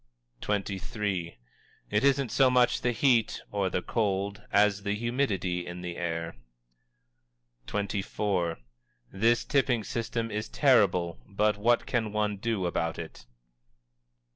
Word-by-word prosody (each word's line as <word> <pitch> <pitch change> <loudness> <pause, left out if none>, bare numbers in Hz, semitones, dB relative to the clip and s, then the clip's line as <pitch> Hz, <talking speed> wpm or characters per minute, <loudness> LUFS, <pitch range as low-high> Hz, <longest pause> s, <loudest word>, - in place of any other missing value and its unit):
_" - - -7 0.5
XXIII. 95 - -2 0.5
"It 105 +1 +2
isn't 135 -3 +2
so 135 +1 +5
much 125 -1 +3
the 120 - +1
heat 120 -1 +2
(or 100 -2 0
the 90 - -2
cold), 100 -2 -1
as 105 0 +3
the 100 0 -1
humidity 105 -7 -1
in 90 +1 -6
the 90 -1 -5
air." 85 -1 -3 1.3
XXIV. 100 -3 -1 0.6
"_This 115 +4 +2
tipping 130 -5 +2
system 115 0 -3
is 105 +1 -3
terrible, 95 - +3
but 105 +1 +1
what 115 +4 +2
can 115 -4 -1
one 105 -1 0
do 105 -2 -1
about 85 -1 -1
it? 80 -7 -9
105 Hz, 125 wpm, -28 LUFS, 90-115 Hz, 1.3 s, so